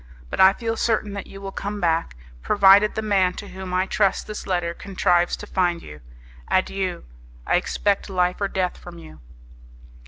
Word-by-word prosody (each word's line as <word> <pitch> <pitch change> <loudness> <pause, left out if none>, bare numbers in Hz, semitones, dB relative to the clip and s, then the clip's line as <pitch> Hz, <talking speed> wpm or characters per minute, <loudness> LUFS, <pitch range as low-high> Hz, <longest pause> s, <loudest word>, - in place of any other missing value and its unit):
But - - -4
I 190 +1 +7
feel 225 0 -3
certain 215 -3 0
that 200 -1 -6
you 195 - -11
will 195 -1 -6
come 205 +1 -5
back, 165 - 0 0.3
provided 200 - +5
the 220 - -2
man 190 -4 +2
to 205 - -9
whom 190 -1 -7
I 185 +1 +1
trust 195 0 +1
this 215 -1 -7
letter 175 -3 -1
contrives 175 -2 +1
to - - -9
find 175 -4 0
you. 75 -1 -11 0.5
Adieu! 185 -1 -1 0.4
I - - +3
expect 205 0 -1
life 180 0 0
or 200 - +1
death 185 -2 -2
from 175 -1 -11
you." 160 -2 -13
190 Hz, 180 wpm, -23 LUFS, 180-200 Hz, 0.5 s, I